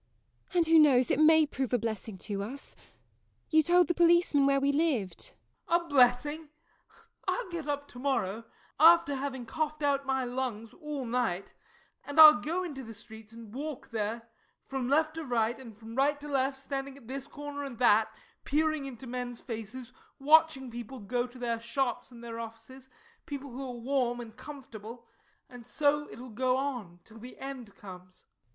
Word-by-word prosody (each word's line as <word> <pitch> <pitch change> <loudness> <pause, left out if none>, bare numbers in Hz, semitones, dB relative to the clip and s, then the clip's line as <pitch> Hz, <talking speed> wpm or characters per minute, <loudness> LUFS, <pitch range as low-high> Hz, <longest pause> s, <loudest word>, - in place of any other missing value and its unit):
And 345 -2 +4
who 325 0 +6
knows 260 -5 +5
it - - +1
may 315 0 +6
prove 265 -3 -3
a - - +5
blessing 220 -2 -4
to 200 -2 -3
us. 255 +8 -6 0.8
You 315 -1 +6
told 350 +3 +4
the 345 - +1
policeman 340 -5 +4
where 275 0 +3
we 280 +1 +2
lived? 280 - -1 0.4
JOE. 335 - +4
A 345 - +2
blessing! 285 +3 +3 0.8
I'll - - -1
get 330 -4 -5
up 285 0 -2
to 245 - -11
morrow, 230 -6 -1 0.4
after 325 -2 +7
having 265 -2 -4
coughed 305 +4 -3
out 280 -1 +1
my 265 -1 +1
lungs 245 -3 -4
all 300 -5 -5
night 230 -6 -1 0.5
and 285 +2 -3
I'll 305 -6 +10
go 340 +7 -2
into 290 -7 -6
the 225 -3 -9
streets 220 +1 -13
and 225 -2 -12
walk 290 +1 -6
there 225 +1 -3 0.4
from 265 -2 -3
left 310 +2 +2
to 325 - -3
right 240 -3 0
and 230 -5 -11
from 225 +1 -11
right 285 +3 +2
to 295 - -9
left, 270 -1 0
standing 275 0 -5
at 250 -5 -16
this 270 +2 -5
corner 290 -1 -7
and 275 -3 -6
at - - -19
that, 220 -2 +4 0.3
peering 310 -1 0
into 260 -2 -8
men's 245 -1 -5
faces, 230 +1 -7 0.2
watching 295 -3 +4
people 240 +2 -7
go 245 +4 -2
to 250 +1 -15
their 235 -2 -2
shops 240 +1 -2
and 235 -2 -13
their 230 -1 -6
offices, 230 +4 -10 0.4
people 280 -1 -6
who 260 +3 -6
are 250 -2 -6
warm 245 -1 0
and 225 -2 -9
comfortable 240 -4 -10 0.4
and 245 -2 -13
so 295 +2 +1
it - - -11
will 250 +1 -9
go 255 +3 +1
on, 245 -11 -4
till 225 0 -14
the 245 +3 -11
end 260 -6 -8
comes. 185 -2 -13
260 Hz, 185 wpm, -30 LUFS, 230-290 Hz, 0.8 s, I'll